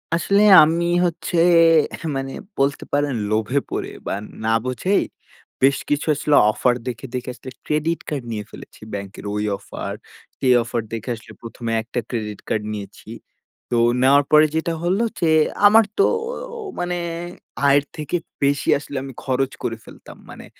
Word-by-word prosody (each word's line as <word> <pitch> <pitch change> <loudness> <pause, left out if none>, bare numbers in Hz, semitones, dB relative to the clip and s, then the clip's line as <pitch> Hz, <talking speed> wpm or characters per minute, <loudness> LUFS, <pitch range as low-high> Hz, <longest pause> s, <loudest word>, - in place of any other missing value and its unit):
আসলে 200 +4 +2 0.2
আমি 165 +2 +1 0.2
হচ্ছে 170 0 -2 0.8
মানে 135 0 -3 0.3
বলতে 140 0 +1
পারেন 145 -1 +1 0.2
লোভে 110 +6 +1
পড়ে - - -3 0.2
বা - - -1 0.3
না 110 - +1
বুঝেই 155 +11 +1 0.6
বেশ 135 +1 +4
কিছু 145 +1 0
আসলে 150 +1 +1 0.2
offer 120 +2 +2
দেখে, 125 +1 -5
দেখে 125 0 -4
আসলে 130 +1 -10 0.2
credit 155 +2 0
card 145 -4 -3
নিয়ে 105 -1 -3
ফেলেছি। - - -13
ব্যাংকের 100 0 -7
ওই 105 0 -1
offer, - - -7 0.4
সেই 125 -1 +3
offer 115 0 -2
দেখে 115 +2 -5
আসলে 115 - -14
১ম 115 +1 -10
এ - - 0
একটা 120 +2 -4
credit 105 -4 -4
card 105 -1 0
নিয়েছি। 100 -2 -9 0.6
তো 120 - +2 0.2
নেওয়ার 140 +2 +5
পরে 155 0 +7
যেইটা 160 +1 -1
হলো 190 +6 +1 0.2
যে 170 -4 +2 0.4
আমার 220 +1 +6
তো - - +5 0.5
ও - - -7 0.2
মানে 175 0 -1 0.7
আয়ের 140 +1 +4
থেকে 155 +3 -2 0.3
বেশি 140 0 +1
আসলে 145 0 -7
আমি 135 -1 -8
খরচ 135 0 0
করে 115 -1 -2
ফেলতাম। - - -14
মানে - - -10
135 Hz, 155 wpm, -21 LUFS, 120-155 Hz, 0.8 s, পরে